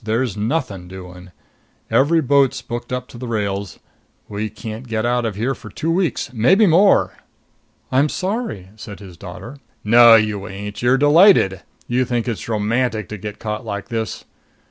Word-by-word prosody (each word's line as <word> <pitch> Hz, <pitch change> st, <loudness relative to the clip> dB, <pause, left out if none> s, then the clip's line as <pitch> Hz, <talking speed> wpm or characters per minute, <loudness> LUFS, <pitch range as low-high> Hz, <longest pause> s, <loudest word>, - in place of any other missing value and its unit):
There's 115 Hz, +1 st, -1 dB
nothing 105 Hz, -, -3 dB
doing. 90 Hz, -1 st, -11 dB, 0.6 s
Every 160 Hz, +5 st, +3 dB
boat's 140 Hz, -1 st, +2 dB
booked 120 Hz, +1 st, -6 dB
up 125 Hz, 0 st, -3 dB
to 120 Hz, -, -11 dB
the 125 Hz, -, -6 dB
rails; 100 Hz, -3 st, -3 dB, 0.5 s
we 105 Hz, +1 st, -4 dB
can't 110 Hz, +3 st, -8 dB
get 110 Hz, 0 st, -2 dB
out 120 Hz, 0 st, +1 dB
of 110 Hz, -4 st, -3 dB
here 120 Hz, +6 st, -1 dB
for -, -, -11 dB
two 165 Hz, -, -3 dB
weeks 170 Hz, -8 st, -1 dB
maybe 175 Hz, -, +4 dB
more." 190 Hz, +3 st, +4 dB, 0.7 s
"I'm 140 Hz, +4 st, +3 dB
sorry," 185 Hz, -, -3 dB
said 105 Hz, -2 st, -9 dB
his 95 Hz, -4 st, -12 dB
daughter. 120 Hz, -, -10 dB, 0.3 s
"No, 115 Hz, +1 st, +8 dB
you 105 Hz, -3 st, 0 dB
ain't! 100 Hz, +2 st, -7 dB
You're 125 Hz, +2 st, +3 dB
delighted! 145 Hz, -, +5 dB, 0.2 s
You 125 Hz, +1 st, +1 dB
think 120 Hz, -1 st, -2 dB
it's 115 Hz, -1 st, -4 dB
romantic 110 Hz, 0 st, -1 dB
to 105 Hz, -, -6 dB
get 105 Hz, +2 st, -7 dB
caught 105 Hz, +2 st, -4 dB
like 100 Hz, -3 st, -6 dB
this. 110 Hz, -3 st, -4 dB
115 Hz, 165 wpm, -20 LUFS, 105-130 Hz, 0.7 s, No